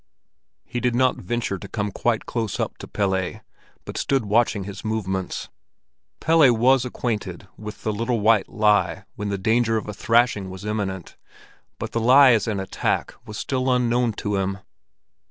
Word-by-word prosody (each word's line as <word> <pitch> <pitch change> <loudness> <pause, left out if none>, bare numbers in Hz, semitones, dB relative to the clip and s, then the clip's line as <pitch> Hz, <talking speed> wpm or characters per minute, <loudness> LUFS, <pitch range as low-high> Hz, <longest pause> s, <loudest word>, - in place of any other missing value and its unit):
He 120 0 -4
did 120 0 0
not 130 +1 +3
venture 120 -5 -3
to - - -8
come 105 -1 -3
quite 115 +3 0
close 115 -4 -3
up - - -3
to - - -8
Pelle, 95 -3 -1 0.4
but - - -5
stood 135 -4 +1
watching 105 -1 +2
his 100 +1 -8
movements. 95 -4 -3 0.7
Pelle 160 -5 +5
was 130 +2 +4
acquainted 105 -7 -4
with 105 0 -9
the 110 - -1
little 115 +2 -1
white 105 -1 +3
lie 105 -1 +2
when 105 0 -4
the 100 - -1
danger 115 +3 +2
of 110 - -4
a 105 - -4
thrashing 115 -2 +2
was 95 +2 -9
imminent, 100 -4 -4 0.6
but - - -5
the 115 - -1
lie 130 +3 +7
as 115 -1 +2
an 105 -3 -1
attack 95 - -1
was 105 - -7
still 130 -1 -1
unknown 120 -1 +2
to 105 0 -2
him. 95 0 -1
110 Hz, 170 wpm, -23 LUFS, 100-120 Hz, 0.7 s, lie